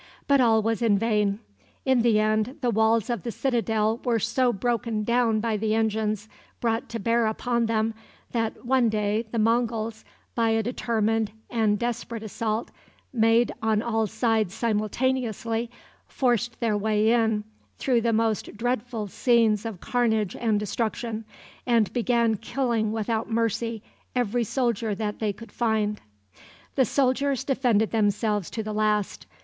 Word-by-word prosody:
But 280 -1 +5
all 225 -3 +4
was 225 +2 0
in 220 -4 +3
vain. 210 -1 +1 0.4
In 260 -3 +3
the 225 -2 +4
end 215 +5 +1
the 245 -2 +1
walls 220 0 +2
of 240 -2 -2
the 235 - -4
citadel 225 -3 0
were 240 -3 +2
so 240 +3 +1
broken 230 0 -1
down 235 -1 +2
by 220 -1 0
the 215 +1 0
engines 215 -1 0 0.3
brought 230 -1 -1
to 230 - -4
bear 230 +2 +2
upon 235 +1 0
them, 225 0 0 0.4
that 230 +1 -2
one 250 -2 +3
day 215 +1 0
the 235 - -2
Monguls, 225 -1 0 0.3
by 230 -1 +1
a 225 0 +2
determined 225 -2 0 0.2
and 220 -3 +2
desperate 235 0 -3
assault 220 +1 -3 0.4
made 230 0 +3
on 220 -1 +1
all 225 -2 0
sides 220 -3 0
simultaneously, 230 +1 -1 0.4
forced 240 -2 0
their 225 -3 +1
way 215 +1 +2
in, 225 -3 +2 0.3
through 245 -3 +2
the 230 0 +1
most 220 -1 0
dreadful 245 -1 -2
scenes 225 0 +2
of 205 -6 -7
carnage 220 -5 0
and 220 -3 +1
destruction, 220 +1 -3 0.4
and 230 -4 +2
began 235 -2 +2
killing 235 -3 -1
without 220 +1 -2
mercy 230 -1 -1 0.3
every 240 -1 +1
soldier 230 -3 0
that 210 0 -3
they 215 -2 0
could 230 +3 -12
find. 215 -3 0 0.7
The 260 - +3
soldiers 270 +2 +1
defended 245 -6 +1
themselves 210 -2 +1
to 220 - -4
the 215 0 -4
last. 210 -1 0
225 Hz, 145 wpm, -26 LUFS, 215-235 Hz, 0.7 s, But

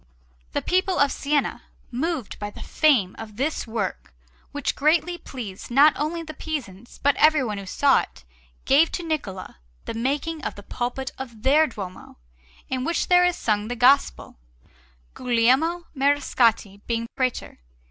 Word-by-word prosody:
The - - -1
people 370 +1 +1
of 285 -1 +3
Siena, 290 0 -1 0.3
moved 275 - -3
by 205 - -4
the - - -10
fame 255 - +2
of 215 -2 -9
this 275 +2 -2
work, 220 -4 -4 0.4
which - - -2
greatly 335 +4 +2
pleased 225 - -8
not 280 +4 +6
only 320 +4 -2
the 310 -1 -8
Pisans 240 - -7
but 285 0 +4
everyone 265 -10 +3
who 195 - -9
saw 275 +7 +3
it, - - -8 0.4
gave 300 +5 +4
to 355 - -3
Niccola 220 - -4 0.3
the - - -4
making 280 +6 -2
of - - -4
the 205 - -11
pulpit 250 +4 -4
of 235 -5 -8
their 300 +4 +5
Duomo, 190 -7 -9 0.5
in 260 -1 -2
which 335 +4 -1
there 360 0 +6
is 355 -1 +1
sung 210 -1 -1
the 245 - -3
Gospel; 255 - +2 0.8
Guglielmo 260 +8 +2
Mariscotti 245 -7 +1
being 230 -1 -1
Prætor. 255 -2 -2
265 Hz, 150 wpm, -24 LUFS, 225-310 Hz, 0.8 s, not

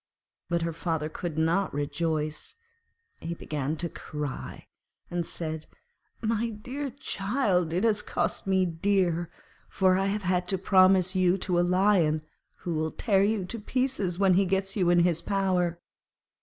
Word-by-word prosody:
But 170 -1 0
her 165 0 -2
father 160 -2 -2
could 160 -1 -5
not 165 +2 +1
rejoice; 155 +1 -2 0.6
he 170 +1 -4
began 150 -1 -3
to 170 - -1
cry, 150 -4 -6 0.5
and 175 -1 -2
said, 160 -2 -4 0.6
'My 225 +1 0
dear 255 +7 -5
child, 200 - 0
it 180 +5 0
has 215 -2 +3
cost - - -2
me 190 -1 +3
dear, 175 -1 0 0.4
for 185 -1 +3
I 195 - +1
have 205 +1 -1
had 180 -1 0
to 190 - +1
promise 185 0 +4
you 185 0 +3
to 180 -3 +1
a - - +5
Lion 175 -4 +3 0.4
who 175 - -1
will 160 0 0
tear 195 +2 +2
you 210 0 +1
in 210 +5 -5
pieces 215 -7 -1
when 195 -1 +4
he 195 +2 +4
has 195 0 -2
you 185 -4 +2
in 175 0 +5
his 170 -1 +2
power.' 185 -4 0
180 Hz, 155 wpm, -28 LUFS, 165-195 Hz, 0.6 s, a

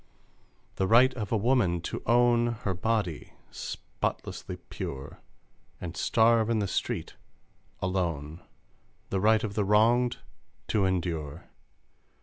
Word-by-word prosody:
The 95 - +1
right 125 +5 +6
of 110 -6 -5
a 115 - +3
woman 105 -6 +2
to - - -5
own 120 0 +4
Her 95 - 0
body 95 -3 -2 0.2
spotlessly - - -5
pure, 70 +1 -7 0.6
And 90 -1 -6
starve 115 -1 +3
in 115 - +2
the 105 -2 0
street - - -3 0.7
alone! 85 -4 -2 0.7
The 95 - +1
right 110 +2 +4
of 105 -3 -3
the 105 - +1
wronged 115 +4 +3 0.5
to 105 -3 +2
endure 85 -5 -3
105 Hz, 120 wpm, -28 LUFS, 90-115 Hz, 0.7 s, right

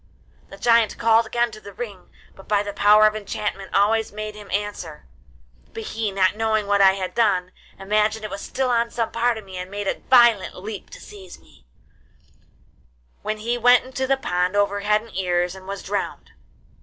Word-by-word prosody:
The - - -11
giant 230 -2 +3
called 225 0 +3
again 240 +1 0
to 215 0 -11
the 200 - -11
ring, 200 -3 -8 0.2
which 195 - -16
by 205 -1 +2
the 205 -1 -6
power 210 +1 +5
of 215 0 +3
enchantment 200 -2 -4
always 220 +2 +2
made 215 +1 -6
him 210 -1 -12
answer; 195 -7 -4 0.7
but 450 - -5
he, 225 - -3
not 190 0 +2
knowing 220 -1 0
what 200 0 +2
I 190 -1 +7
had 190 -1 -4
done, 185 -6 +1 0.3
imagined 215 +2 0
it 210 - -6
was 200 +1 -6
still 260 -2 -2
on 235 0 +1
some 230 -1 -2
part 235 0 +1
of 215 - -9
me, 190 -1 -9
and 180 0 -6
made 205 0 -5
a - - -1
violent 235 -6 +5
leap 205 +2 -8
to - - -12
seize 190 -3 -12
me, 65 - -24 1.5
when 215 0 -3
he 235 +3 -2
went 245 +1 +5
into 260 0 -3
the 270 0 +2
pond, 180 -6 -1
over 205 0 +1
head 210 +1 +1
and 230 - -15
ears, 180 -1 0
and 190 0 -12
was 195 0 -6
drowned. 200 +1 -4
210 Hz, 195 wpm, -22 LUFS, 195-225 Hz, 1.5 s, I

